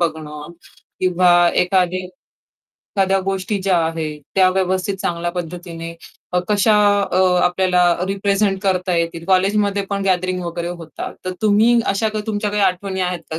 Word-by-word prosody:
बघणं 155 -1 -4 0.5
किंवा 175 -1 +4
एखादी 180 0 +1
एखाद्या 195 -1 -5
गोष्टी 195 +1 -2
ज्या 190 -2 +2
आहेत, 155 -2 -4
त्या 190 -1 +5
व्यवस्थित 190 +1 -1
चांगल्या 175 0 -2
पद्धतीने 170 -1 -6 0.5
कशा 210 +1 +3 0.4
अ, 185 - +2 0.3
आपल्याला 180 0 +2 0.3
रिप्रेझेंट 195 0 0
करता 185 -2 0
येतील. 165 0 -2
कॉलेजमध्ये 200 +1 +2
पण 200 0 -1
गॅदरिंग 185 -1 0
वगैरे 170 0 -4
होतात. 170 -3 -7
तर 185 - -3
तुम्ही 220 +3 +4
अशा 200 +3 +1
काही 215 0 -5
तुमच्या 210 -1 -2
काही 210 0 0
आठवणी 190 0 -1
आहेत 180 -1 -1
का? 160 - -3
185 Hz, 140 wpm, -19 LUFS, 175-195 Hz, 0.5 s, त्या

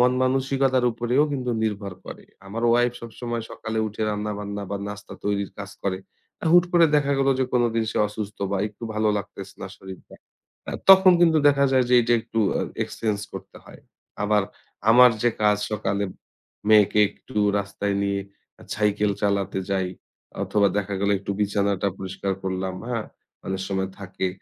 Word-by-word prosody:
মন-মানসিকতার 130 +1 +2
উপরেও 120 +5 +2
কিন্তু 125 -3 -2
নির্ভর 105 -3 -2
করে। - - -9 0.2
আমার 110 +4 -5
ওয়াইফ 120 +1 +3
সবসময় 115 0 -5
সকালে 110 0 -4
উঠে 110 +1 -5
রান্নাবান্না 105 -1 -4
বা 100 - -1
নাস্তা 105 0 -8
তৈরির 100 -1 -1
কাজ 100 -1 -6
করে। 95 -1 -1 0.4
আ - - -3
হুট 175 0 +7
করে 170 -1 +6
দেখা 140 -1 +1
গেল 135 0 +2
যে 130 - +2
কোনদিন 115 -2 +2
সে - - -2
অসুস্থ 105 0 -6
বা 100 - 0
একটু 105 +2 -22
ভালো 110 0 +1
লাগতেছে 100 - -9
না - - -5
শরীরটা। 95 -1 -12 0.6
আ - - -5 0.2
তখন 190 -1 +9
কিন্তু 165 -2 +5
দেখা 140 -1 +3
যায় 130 -1 +4
যে 125 - +4
এইটা 120 0 +1
একটু 115 - -5 0.2
অ - - 0 0.2
এক্সচেঞ্জ 110 -3 -2
করতে - - -9
হয়। - - -14 0.4
আবার 105 0 +3 0.5
আমার 125 +1 +8
যে 120 - +4
কাজ 105 0 +4 0.2
সকালে 100 -1 -1 0.6
মেয়েকে 105 -1 +5
একটু 130 - -15 0.2
রাস্তায় 100 0 -2
নিয়ে 100 0 0 0.4
আ - - -12
সাইকেল 105 0 +1
চালাতে 100 -1 0
যাই 95 -2 0 0.6
অথবা 100 -1 +2
দেখা 100 0 -3
গেলো 100 0 +2
একটু 100 +1 -6
বিছানাটা 100 -1 +1
পরিষ্কার 95 +1 -3
করলাম, 95 0 -3
হ্যাঁ? 115 -3 -2 0.4
অনেক 95 0 -2
সময় 95 -1 -2
থাকে। 95 -1 -3
105 Hz, 165 wpm, -24 LUFS, 100-120 Hz, 0.6 s, তখন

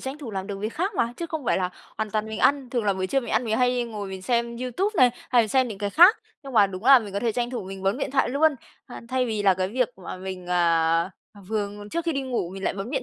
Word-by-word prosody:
tranh 270 +3 -6
thủ 260 -7 -7
làm 190 -1 -4
được 200 -2 -5
việc 215 +3 -3
khác 380 +6 -1
mà, 235 -7 0
chứ 340 - -4
không 315 -4 -5
phải - - +2
là 180 -1 -1 0.3
hoàn 220 -1 -2
toàn 215 0 -1
mình 220 - -5
ăn. 275 -3 +2
Thường 240 -4 -1
là 200 - +3
buổi 185 0 -2
trưa 270 +8 +1
mình 235 - -7
ăn - - +1
mình 220 -1 0
hay 250 -1 +2
ngồi 210 -4 -6
mình 190 -1 -7
xem 235 +1 0
YouTube 255 - -1
này 250 -2 +6 0.2
hay 240 -2 +5
mình 215 - -3
xem 260 +1 +2
những 200 -3 -7
cái 205 -1 -2
khác, 355 - +7 0.3
nhưng 270 -1 -9
mà 205 -3 +6
đúng 185 +3 -8
là 270 -1 +9
mình 205 -4 -8
có 200 - -2
thể 230 -2 0
tranh 240 +1 -2
thủ 245 -6 -4
mình 190 0 -8
bấm 195 +7 0
điện - - -2
thoại 270 - +2
luôn, 295 +4 +3 0.3
a, 245 - -9
thay 255 -1 0
vì 215 -3 -2
là 190 -2 +5
cái 185 0 -1
việc 250 +2 0 0.2
mà - - -6
mình, 185 -1 -7
à, 170 0 +2 0.4
vừa 210 -2 -1 0.2
trước 335 0 -2
khi 330 - 0
đi 275 -1 -2
ngủ 245 -9 -2
mình 195 +1 -7
lại - - 0
bấm 200 +4 -5
điện 270 -2 -1
230 Hz, 305 wpm, -25 LUFS, 195-260 Hz, 0.4 s, là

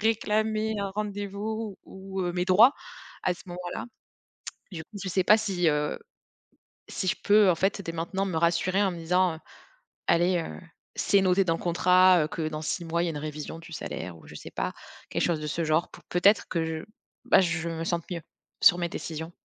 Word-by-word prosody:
réclamer 220 0 +1
un 200 -1 -2
rendez-vous 205 +1 -4
ou, 190 0 -7
heu, 175 -1 -1
mes 180 0 0
droits 205 +8 +7 0.5
à 180 - +2
ce 175 - -11
moment-là?» 175 +2 -6 0.9
Du 165 -3 -5
coup 205 +5 -11
je 195 - -3
sais 185 0 +1
pas 210 - +7
si, 190 -6 +1
heu, 150 -1 0 0.9
si - - -4
je - - +2
peux 205 -2 +6
en - - +1
fait, 195 +3 0
dès 165 - -4
maintenant 170 +4 -2
me 185 -4 -3
rassurer 170 +3 +2
en 200 - +3
me 175 - -7
disant, 180 +1 +1
heu: - - -12 0.7
«Allez, 175 +2 +3
heu, 165 - -5 0.4
c'est 200 -1 +3
noté 190 +1 +3
dans 165 -2 +1
le - - -10
contrat, 180 0 +5
heu, - - -3
que 160 0 -3
dans 155 0 -5
6 170 +2 -2
mois, 170 +1 0
il - - 0
y - - 0
a - - -1
une 155 - -5
révision 150 +1 -6
du 165 0 -12
salaire», 85 - -6
ou - - -17
je - - -12
sais - - -9
pas, - - -3 0.3
quelque - - -1
chose 165 -3 0
de 150 - -4
ce 165 +3 -2
genre 155 +2 +1
pour - - -15
peut-être 200 +4 +4
que 165 -2 -1
je, 160 -1 -4 0.4
bah, - - +5
je 170 -2 0
me 165 0 -4
sente 170 -1 -1
mieux 175 -2 -3 0.4
sur 175 - +7
mes 175 -1 -1
décisions. 160 0 -6
175 Hz, 215 wpm, -27 LUFS, 165-195 Hz, 0.9 s, droits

